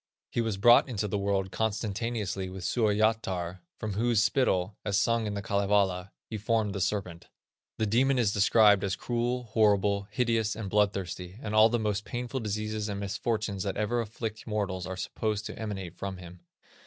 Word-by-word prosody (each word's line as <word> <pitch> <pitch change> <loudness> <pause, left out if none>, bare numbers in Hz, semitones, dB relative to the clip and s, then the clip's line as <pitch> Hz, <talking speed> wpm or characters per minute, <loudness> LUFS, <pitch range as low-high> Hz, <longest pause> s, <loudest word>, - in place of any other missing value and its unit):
He 120 - 0
was 110 -4 -1
brought 120 +6 +6
into 110 -3 -2
the 100 0 -1
world 100 -1 0
consentaneously 105 -1 -2
with 95 0 -8
Suoyatar, 105 -3 +1 0.2
from 110 -2 -4
whose 115 +2 +2
spittle, 100 -4 +1
as 100 -2 0
sung 115 +1 +2
in 105 - -3
The 100 - -4
Kalevala, 100 -2 +1
he 110 - -6
formed 110 -1 0
the 100 - -3
serpent. 90 -3 -2 0.5
This 110 - 0
demon 130 +5 +3
is 110 -5 +2
described 105 -1 +5
as 100 -1 0
cruel, 120 +1 -1
horrible, 105 -3 +2
hideous, 115 -1 0
and 105 -4 -5
bloodthirsty, 95 -3 -1
and 110 -6 -5
all 110 +1 +7
the 120 - +1
most 105 -2 -1
painful 120 +3 -4
diseases 110 -1 -3
and 100 -1 -3
misfortunes 100 0 -2
that 95 0 -2
ever 115 +3 0
afflict 110 0 -6
mortals 100 -4 -2
are 95 0 -5
supposed 110 +2 -2
to - - -7
emanate 95 -5 -5
from 95 -1 -4
him. 90 0 -11
105 Hz, 175 wpm, -29 LUFS, 95-110 Hz, 0.5 s, all